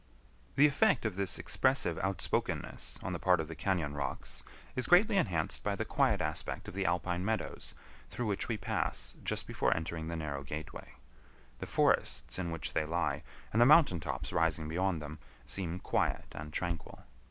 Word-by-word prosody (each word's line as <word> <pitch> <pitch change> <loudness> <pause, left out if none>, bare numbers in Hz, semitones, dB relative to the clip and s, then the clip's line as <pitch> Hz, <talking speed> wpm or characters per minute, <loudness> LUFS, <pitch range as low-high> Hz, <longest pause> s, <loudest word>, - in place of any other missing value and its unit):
The 145 - +7
effect 140 -4 +3
of 110 -4 0
this 100 -2 0
expressive 130 - +1
outspokenness 95 -3 -2
on 95 - -2
the 85 - -3
part 90 -2 +4
of 80 - -2
the 80 - -7
cañon 85 -4 0
rocks 70 -1 -4 0.3
is 130 - 0
greatly 190 +4 +6
enhanced 95 - +1
by - - 0
the - - -2
quiet - - +2
aspect - - -2
of - - -7
the 95 0 0
alpine 90 +1 0
meadows 110 +2 -2 0.3
through 120 - -3
which 100 -2 0
we 115 - -1
pass 95 - -2
just - - 0
before - - +1
entering 80 0 -4
the 85 - -3
narrow 75 -3 -3
gateway. 75 +3 -7 0.7
The - - -5
forests - - +1
in 85 -2 -2
which 80 -1 -4
they - - +2
lie, 75 -3 -1 0.3
and 115 - +4
the 120 - +8
mountain 140 - +7
tops - - -4
rising 80 -1 +1
beyond 85 0 0
them, 75 +1 -7 0.3
seem 90 -3 -2
quiet - - 0
and 75 +1 -7
tranquil. 85 0 -4
85 Hz, 175 wpm, -33 LUFS, 80-100 Hz, 0.7 s, the